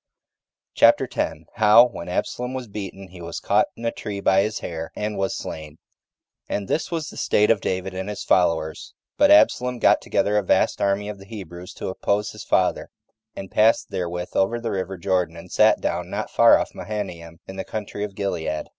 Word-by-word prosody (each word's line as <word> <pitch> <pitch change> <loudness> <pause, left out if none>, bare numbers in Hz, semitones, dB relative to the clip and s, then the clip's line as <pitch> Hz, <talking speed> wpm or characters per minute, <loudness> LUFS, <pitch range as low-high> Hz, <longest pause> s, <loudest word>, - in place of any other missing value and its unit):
CHAPTER - - +5
10. - - -3
How, 110 +3 +7
When 90 -7 -8
Absalom 125 +7 -3
Was 130 -2 -5
Beaten, 100 -2 -7
He 90 -1 -12
Was 85 0 -6
Caught - - +2
In 115 - -8
A 115 - +1
Tree 105 -4 -6
By 95 0 +3
His 105 +1 -2
Hair 80 -1 -6
And 105 0 -3
Was 95 -1 -1
Slain 75 0 -7 0.7
1. - - -1
And 100 -1 -7
this 155 - -1
was 165 -3 -3
the - - -12
state 105 +2 +3
of 110 - +1
David 95 0 -2
and 95 +2 -4
his 105 - -5
followers: 80 -3 0 0.2
but 290 0 +6
Absalom 125 - +4
got - - +4
together 105 +1 +1
a - - +3
vast - - +1
army 100 +1 +1
of 105 -1 -6
the 100 - -14
Hebrews 90 -4 -9
to - - -5
oppose 100 +2 -1
his 105 - -9
father, 90 - +1 0.5
and 95 - -8
passed 110 +2 +3
therewith 90 0 -3
over 105 +5 +1
the 115 -1 -3
river 95 0 -3
Jordan, 90 -2 -1
and 85 - -12
sat - - +4
down - - -2
not - - -4
far - - +6
off - - -4
Mahanaim, 85 -6 -6
in 95 - -9
the 95 - -3
country 105 -1 -5
of 100 -2 -6
Gilead. 80 -6 -3
100 Hz, 200 wpm, -23 LUFS, 90-105 Hz, 0.7 s, How